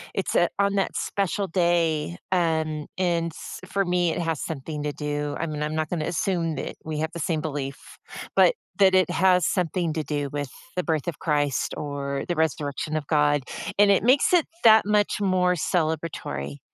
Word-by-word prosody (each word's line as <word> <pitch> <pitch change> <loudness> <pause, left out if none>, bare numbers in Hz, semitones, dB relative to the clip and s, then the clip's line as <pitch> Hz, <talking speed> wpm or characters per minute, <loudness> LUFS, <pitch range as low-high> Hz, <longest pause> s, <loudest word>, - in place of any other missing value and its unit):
it's, 195 - -1
uh, 175 - +5
on 200 0 +2
that 195 - 0
special 200 0 -1
day, 165 - +1
um, 160 -4 0
and, 170 -3 0
s - - -8
for 195 +1 0
me, 175 -1 +1
it - - -3
has 165 -3 -2
something 150 0 -5
to 145 -1 -2
do, 145 -1 -3
I 165 - -1
mean, 150 -1 -4
I'm 150 +1 -2
not 155 -1 -1
gonna 160 -3 -2
assume 170 -2 -1
that - - -5
we 155 -1 -3
have 160 0 -2
the 170 - -5
same 160 0 -1
belief, 140 -2 -6 0.4
but - - +6 0.3
that 190 -1 +6
it 185 - +4
has 180 -1 +3
something 175 -2 0
to 160 -2 -2
do 145 -1 -2
with 145 -2 -3 0.3
the 180 - +1
birth 160 -1 -1
of 160 - -7
Christ 145 -3 0
or 140 -2 -3
the 175 - 0
resurrection 155 -1 -1
of 150 -2 -2
God, 145 -2 +2 0.3
and 205 0 +6
it 195 - +4
makes 260 +8 +4
it 345 -4 +5 0.2
that 220 -2 +7
much 210 0 +2
more 180 -2 +2
celebratory. 155 - -2
160 Hz, 190 wpm, -25 LUFS, 150-180 Hz, 0.4 s, that